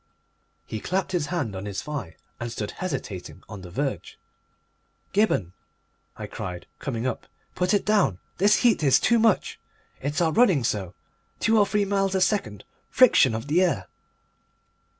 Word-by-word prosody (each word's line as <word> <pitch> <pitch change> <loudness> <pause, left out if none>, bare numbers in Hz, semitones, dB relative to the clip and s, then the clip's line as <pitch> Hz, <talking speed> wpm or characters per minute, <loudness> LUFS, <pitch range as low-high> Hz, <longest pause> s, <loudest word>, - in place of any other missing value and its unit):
He 110 - -5
clapped 185 - -2
his 170 -5 0
hand 145 - -2
on 95 +2 -5
his 100 -1 -4
thigh 140 - -5 0.2
and 120 0 -4
stood 105 -3 -4
hesitating 130 - -6
on 100 - -9
the 90 - -10
verge. 130 - -3 1.0
"Gibberne," 190 - +1 0.6
I - - -5
cried, 90 -1 -6
coming 120 -4 -3
up, 130 - -3 0.3
"put 180 0 0
it 205 - +2
down. 200 - +2 0.2
This 205 +3 +4
heat 230 -7 +4
is 135 -3 +5
too 235 -1 +3
much! 225 -3 +2 0.4
It's 145 +4 -2
our 165 -2 +2
running 190 - +4
so! 100 -6 -2 0.4
Two 225 -1 +3
or 205 - +4
three 205 0 +1
miles 195 -1 0
a 190 - +1
second! 130 - 0 0.3
Friction 145 - +5
of 115 - -4
the 155 +5 +2
air!" 130 - 0
150 Hz, 160 wpm, -25 LUFS, -, 1.0 s, is